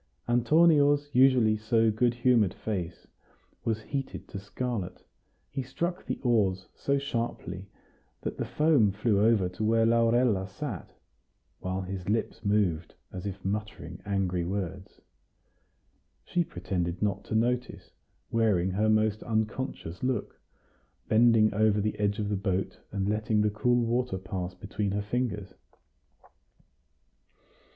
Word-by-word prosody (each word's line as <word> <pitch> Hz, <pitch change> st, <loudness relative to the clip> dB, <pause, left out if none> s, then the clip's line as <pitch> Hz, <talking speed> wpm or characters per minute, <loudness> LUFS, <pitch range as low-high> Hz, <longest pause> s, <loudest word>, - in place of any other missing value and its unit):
Antonio's 145 Hz, +3 st, +4 dB
usually 125 Hz, -4 st, +5 dB
so 110 Hz, +1 st, +2 dB
good 120 Hz, +2 st, +1 dB
humored 120 Hz, -6 st, +3 dB
face 90 Hz, -6 st, -4 dB, 0.6 s
was 110 Hz, -1 st, -1 dB
heated 135 Hz, +2 st, -5 dB
to 100 Hz, -, -6 dB
scarlet; 100 Hz, -1 st, -4 dB, 0.5 s
he 135 Hz, -, -2 dB
struck 165 Hz, +8 st, -3 dB
the -, -, -2 dB
oars 100 Hz, -7 st, +2 dB
so 140 Hz, 0 st, 0 dB
sharply 115 Hz, -8 st, -4 dB, 0.5 s
that -, -, -4 dB
the -, -, -1 dB
foam 150 Hz, -9 st, +3 dB
flew 105 Hz, 0 st, +1 dB
over 110 Hz, -5 st, +4 dB
to 90 Hz, +4 st, -5 dB
where 115 Hz, +1 st, +3 dB
Laurella 115 Hz, -3 st, +3 dB
sat, 105 Hz, -, -6 dB, 0.7 s
while 95 Hz, +1 st, -3 dB
his 95 Hz, 0 st, -5 dB
lips 110 Hz, +1 st, -1 dB
moved 100 Hz, -6 st, 0 dB, 0.2 s
as 95 Hz, +2 st, -6 dB
if 100 Hz, -1 st, -7 dB
muttering 100 Hz, -4 st, -4 dB
angry 95 Hz, -4 st, -1 dB
words. 95 Hz, +1 st, -5 dB, 1.2 s
She 175 Hz, -, +1 dB
pretended 90 Hz, -, -3 dB
not 100 Hz, -1 st, 0 dB
to -, -, -3 dB
notice, 120 Hz, +2 st, -1 dB, 0.4 s
wearing 100 Hz, -5 st, +2 dB
her 105 Hz, +3 st, +1 dB
most 110 Hz, 0 st, +2 dB
unconscious 110 Hz, -5 st, -3 dB
look, 125 Hz, -5 st, -2 dB, 0.7 s
bending 110 Hz, -1 st, +5 dB
over 105 Hz, 0 st, +3 dB
the 105 Hz, +1 st, -2 dB
edge 100 Hz, 0 st, +1 dB
of 105 Hz, -1 st, -2 dB
the 105 Hz, -, 0 dB
boat, 95 Hz, -1 st, -2 dB
and 100 Hz, -1 st, -1 dB
letting 105 Hz, 0 st, +1 dB
the 105 Hz, 0 st, +2 dB
cool 120 Hz, +3 st, +2 dB
water 120 Hz, -2 st, 0 dB
pass 90 Hz, -1 st, -5 dB
between 100 Hz, +2 st, -3 dB
her 100 Hz, 0 st, -1 dB
fingers. 105 Hz, -4 st, -2 dB
105 Hz, 130 wpm, -28 LUFS, 95-120 Hz, 1.2 s, usually